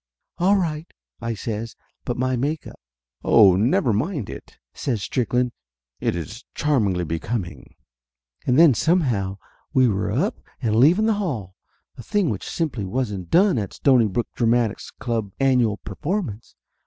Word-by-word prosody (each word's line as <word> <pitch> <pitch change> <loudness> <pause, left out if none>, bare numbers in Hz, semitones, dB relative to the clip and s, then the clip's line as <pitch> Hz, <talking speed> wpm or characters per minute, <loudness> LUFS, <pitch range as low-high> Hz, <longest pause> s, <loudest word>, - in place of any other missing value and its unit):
"All 190 +4 +4
right 160 -3 -2 0.2
!" - - -41
I 115 - -1
says. 110 +2 -5 0.3
"But 120 - -2
my 130 +1 0
make 145 +6 -2
up - - -11 0.3
" - - -41
"Oh, 100 -5 +6
never 115 +3 +2
mind 135 - -2
it," - - -11 0.2
says 115 -7 -2
Strickland. 125 +3 0 0.5
"It - - 0
is 105 +8 -6
charm 145 -7 +2
ingly 90 -3 -1
becoming." 85 +4 -4 0.7
And 125 0 +3
then 160 -4 +7
somehow 120 - +1 0.4
we 130 -1 +5
were 100 -4 0
up - - 0 0.2
and 110 -2 0
leaving 165 - +5
the 225 - +3
hall. 110 - -3 0.4
A - - -8
thing 185 - 0
which 95 -4 -5
simply 150 - -2
wasn't 100 -4 -3
done 185 - +4
at 100 - -5
a - - -24
Stonybrook 120 -5 +3
Dramatic 115 -2 +1 0.2
Club's 110 -5 -3
annual 125 -6 +3
performance. 150 - -4
120 Hz, 155 wpm, -23 LUFS, 105-145 Hz, 0.7 s, then